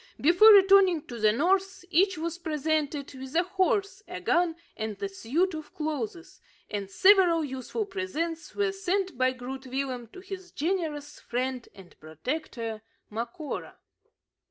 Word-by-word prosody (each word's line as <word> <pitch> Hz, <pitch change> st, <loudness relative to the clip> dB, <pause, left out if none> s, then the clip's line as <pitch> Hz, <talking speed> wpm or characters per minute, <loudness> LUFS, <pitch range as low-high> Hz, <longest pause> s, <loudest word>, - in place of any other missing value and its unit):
Before 355 Hz, +8 st, +7 dB
returning 385 Hz, -5 st, +6 dB
to 240 Hz, -2 st, -8 dB
the 215 Hz, 0 st, +4 dB
north, 375 Hz, -, +1 dB
each 370 Hz, +2 st, +3 dB
was 335 Hz, +2 st, -4 dB
presented 305 Hz, -3 st, -1 dB
with 265 Hz, +2 st, -9 dB
a 345 Hz, -, +4 dB
horse, 385 Hz, +2 st, 0 dB
a -, -, -6 dB
gun, 345 Hz, -2 st, +2 dB, 0.2 s
and 220 Hz, -2 st, -5 dB
a 200 Hz, -, -2 dB
suit 275 Hz, -, -1 dB
of 310 Hz, +3 st, -8 dB
clothes; 320 Hz, -, -4 dB, 0.3 s
and 200 Hz, -2 st, -3 dB
several 355 Hz, -, +5 dB
useful 265 Hz, -, -4 dB
presents 340 Hz, -4 st, -4 dB
were 410 Hz, -1 st, +1 dB
sent 385 Hz, -2 st, -1 dB
by 255 Hz, +1 st, +2 dB
Groot 260 Hz, +1 st, -7 dB
Willem 255 Hz, -2 st, -3 dB
to 235 Hz, -, -13 dB
his 375 Hz, -1 st, -8 dB
generous 300 Hz, -3 st, -3 dB
friend 255 Hz, 0 st, -3 dB
and 190 Hz, -3 st, -15 dB
protector, 225 Hz, -, -5 dB, 0.3 s
Macora. 235 Hz, +7 st, -5 dB
315 Hz, 140 wpm, -28 LUFS, 255-370 Hz, 0.3 s, Before